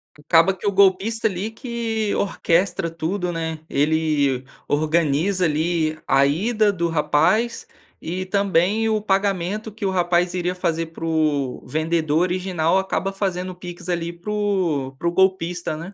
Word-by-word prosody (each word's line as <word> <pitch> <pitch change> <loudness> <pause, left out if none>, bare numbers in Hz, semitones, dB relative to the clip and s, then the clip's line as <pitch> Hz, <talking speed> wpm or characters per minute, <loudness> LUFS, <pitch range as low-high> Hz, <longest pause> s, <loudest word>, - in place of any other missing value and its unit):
Acaba 165 +4 +3
que 190 - -10
o 205 - +3
golpista 200 +4 +3
ali 200 +2 -3
que 225 -3 -3
orquestra 185 -1 0
tudo, 175 +3 -2
né. 160 -1 -3
Ele 145 -3 +1 0.2
organiza 155 +4 +1
ali 155 0 0
a 135 +1 +4
ida 210 +9 +2
do 170 -2 -1
rapaz, 190 +9 +1 0.3
e 180 +3 -4
também 200 +2 +1
o 215 -1 +1
pagamento 200 +1 -1
que 210 0 -6
o - - +2
rapaz 175 -1 +1
iria 180 0 -1
fazer 165 -2 -1
para 165 0 -11
o 150 -5 0
vendedor 160 0 0
original 180 -1 +1
acaba 190 0 -1
fazendo 185 -2 -2
o - - -10
PIX 175 0 -9
ali 170 -1 -2
para 175 +5 -7
o 185 -10 0
para 170 - -2
o - - +2
golpista, 180 -3 +1
né. 170 +5 -8
175 Hz, 150 wpm, -22 LUFS, 160-195 Hz, 0.3 s, a